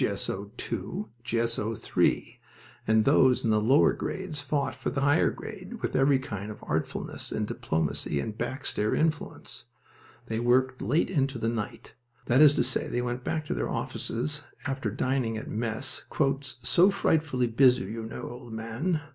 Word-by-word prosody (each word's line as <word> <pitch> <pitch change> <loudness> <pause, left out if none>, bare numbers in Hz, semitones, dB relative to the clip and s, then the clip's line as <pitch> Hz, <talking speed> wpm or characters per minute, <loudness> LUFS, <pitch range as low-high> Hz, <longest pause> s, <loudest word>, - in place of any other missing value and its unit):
S.O. 100 +1 -2 0.2
II, 105 - -3 0.2
G.S.O. 115 -2 -1
III, - - 0 0.5
and 110 0 +4
those 130 -2 +5
in 115 - +2
the 105 0 +3
lower 130 +7 +5
grades 185 -6 -4
fought 140 -1 -1
for 130 - -3
a - - -2
higher 145 +4 +4
grade 210 +2 -8
with - - -1
every 135 0 +5
kind 105 -6 -5
of 105 - -9
artfulness, - - -3
and - - -1
diplomacy 80 -2 -1
and 105 +9 -3
back 125 +4 -4
stair 105 +1 0
influence. 155 -6 -2 0.6
They 110 -2 -2
worked 130 +2 +2
late 155 +8 +1
into 135 -6 +1
the 115 0 0
night. 115 -3 -5 0.3
That 130 +4 +4
is 145 -1 +8
to - - +3
say, - - -1
they 120 - -1
went 120 +1 -3
back 155 +2 -2
to - - -2
their - - -2
offices 150 +6 -2 0.2
after 135 -5 -1
dining 125 0 0
at 110 - -6
mess 115 +4 -2 0.6
"so 170 +10 +5
frightfully 155 -9 +1
busy, 125 +2 +4
you 110 +4 -5
know, 110 0 -6
old 120 -1 -9
man!" 120 +10 -2
125 Hz, 165 wpm, -28 LUFS, 115-145 Hz, 0.6 s, is